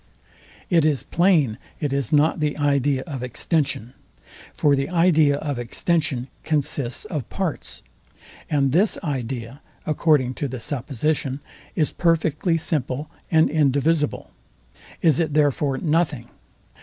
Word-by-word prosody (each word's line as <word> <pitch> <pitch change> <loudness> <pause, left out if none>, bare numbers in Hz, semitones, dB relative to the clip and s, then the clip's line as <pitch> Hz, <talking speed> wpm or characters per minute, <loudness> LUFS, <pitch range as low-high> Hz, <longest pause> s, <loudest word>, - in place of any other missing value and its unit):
It 170 -3 +4
is 150 -5 +2
plain 155 - +2 0.2
it 145 -3 -2
is 140 +2 -1
not 155 +2 +3
the 150 -1 -1
idea 140 -2 +1
of 140 -7 -6
extension. 125 - -1 0.6
For 145 -1 +3
the 135 0 -2
idea 165 -5 +4
of 145 -4 -3
extension 135 +1 -1 0.2
consists 145 - 0
of 155 - -5
parts; 190 -6 -4 0.7
and 140 -3 +2
this 190 - +3
idea, 130 -2 -4 0.2
according 150 -4 +2
to 145 - 0
the 130 -1 -6
supposition, 135 +3 -1 0.4
is 155 -3 0
perfectly 165 0 +1
simple 150 -1 -2 0.2
and 160 -1 +4
indivisible. 150 +1 +1 0.7
Is 160 -3 +4
it 155 -3 0
therefore 145 -2 +2
nothing? 150 -6 0
145 Hz, 120 wpm, -23 LUFS, 135-160 Hz, 0.7 s, It